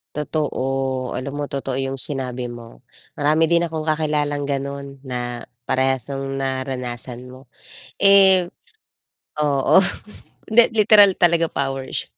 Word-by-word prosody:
Totoo, 135 -4 -2
alam 140 +3 -5
mo 145 - -3
totoo 135 -2 -3
yung 135 0 -3
sinabi 125 -3 -3
mo, 120 -1 -11 0.4
marami 155 +3 +2
din 170 0 +3
akong 160 -1 -5
kakilalang 150 -2 -1
ganun 140 0 -4
na 120 -2 -5 0.2
parehas 130 -2 0
nung 135 0 -4
naranasan 125 -2 -3
mo. 130 0 -15 0.5
Eh 195 -2 +6 1.0
oo, 145 +5 +3 0.7
hindi 235 +1 +7
literal 205 -2 +6
talaga 170 -1 +3
powers. 135 -2 -3
135 Hz, 115 wpm, -21 LUFS, 130-155 Hz, 1.0 s, hindi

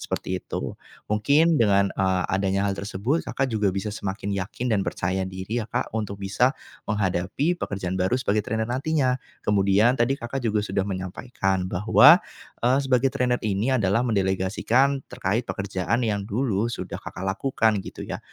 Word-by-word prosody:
seperti 95 0 -3
itu. - - -5 0.3
Mungkin 145 +10 +3
dengan, 100 -2 +4
eee, 95 -1 +1
adanya 95 +1 +1
hal 100 - -2
tersebut 105 - -2
Kakak 135 0 -1
juga 105 -3 +1
bisa 100 +2 -3
semakin 100 -1 -4
yakin 105 +6 -3
dan 100 - +2
percaya 95 +1 -1
diri 95 +5 -4
ya - - -12
Kak, - - -2
untuk 100 -2 -4
bisa 125 +7 +2 0.4
menghadapi 105 - 0
pekerjaan 95 - -3
baru 95 +7 +2
sebagai 105 -2 +1
trainer 110 +1 -1
nantinya. 130 0 +1 0.3
Kemudian 100 +3 +4
tadi 120 +4 +1
Kakak 120 +3 -4
juga 105 -1 +1
sudah 95 -2 -1
menyampaikan 95 0 -2
bahwa, 115 - +7 0.5
eee, 130 +3 +4
sebagai 130 0 +3
trainer 125 -1 +1
ini 105 +5 0
adalah 100 0 +2
mendelegasikan 110 +6 +1
terkait 115 -1 -2
pekerjaan 100 +3 -1
yang 100 -2 -1
dulu 110 -1 0
sudah - - -5
Kakak 90 - -8
lakukan 110 0 +1
gitu - - -8
ya. - - -4
105 Hz, 155 wpm, -25 LUFS, 95-125 Hz, 0.5 s, bahwa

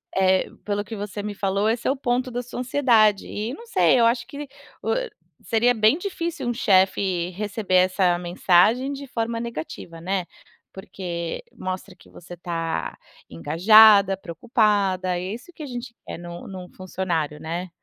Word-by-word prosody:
é 190 0 +3 0.2
pelo 205 0 -1
que 210 +2 -8
você 205 0 -5
me 210 0 -4
falou, 200 +2 0
esse 230 +1 -1
é - - +4
o - - -1
ponto 255 -1 -1
da 245 +1 -2
sua 245 - -8
ansiedade 240 -6 +3
e 220 +4 -4
não 465 - -10
sei. 465 - +3
Eu 230 - +5
acho 235 +1 +1
que 290 0 -7 0.3
o - - 0 0.5
seria 235 +1 +2
bem 220 +5 +3
difícil 340 -7 -4
um 240 - 0
chefe 190 -4 +2
receber 205 0 -2
essa 185 -1 +3
mensagem 185 +8 +3
de 280 0 -8
forma 230 -1 -2
negativa, 165 -6 -7
né. 185 +1 -1 0.5
Porque 175 -3 -5
mostra 185 0 -6
que - - -20
você 175 +1 -11
tá 165 -1 -4 0.3
engajada, 195 - +6
preocupada. 195 - 0
É - - -4
isso 250 +10 -10
que 325 - -12
a - - -5
gente 245 -1 -7
quer - - -6
num 175 0 -9
num 185 -2 -8
funcionário, 175 -5 -3
né? 170 +4 -5
200 Hz, 165 wpm, -23 LUFS, 180-235 Hz, 0.5 s, engajada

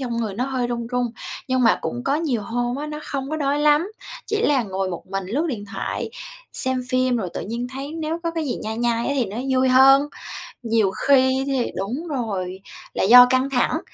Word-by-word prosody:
trong 245 -3 -3
người 220 -4 -2
nó 245 - -1
hơi 260 -2 -1
run 235 -1 -3
run. 245 0 0 0.4
Nhưng 255 -1 +2
mà 230 - +4
cũng 245 +1 -4
có 275 - +1
nhiều 290 -8 -1
hôm 240 +3 -2
á, 295 +2 -4
nó 300 0 -5
không 275 0 -4
có 310 - -1
đói 285 -1 0
lắm, 300 +6 +3 0.3
chỉ 430 0 -1
là 280 - +3
ngồi 190 -2 -3
một 175 - -7
mình 195 0 -4
lướt 280 - -1
điện 225 -9 -4
thoại, - - -3 0.4
xem 260 -1 -1
phim 255 -1 +2
rồi 195 -6 -2
tự - - -3
nhiên 235 +4 -4
thấy 275 +3 -6
nếu 320 0 -3
có 335 - -1
cái 330 -1 -3
gì 265 - -2
nhai 220 +1 -3
nhai 235 -1 0
á 280 - +1
thì 255 - +2
nó 200 +1 -7
vui 260 0 +3
hơn. 270 +2 +6 0.5
Nhiều 225 -4 +2
khi 265 +3 +3
thì 265 -3 0
đúng 245 - -3
rồi, 195 - -3 0.3
là - - +1
do 245 +5 +9
căng 260 +1 +2
thẳng, 275 +5 +1
255 Hz, 225 wpm, -22 LUFS, 230-280 Hz, 0.5 s, do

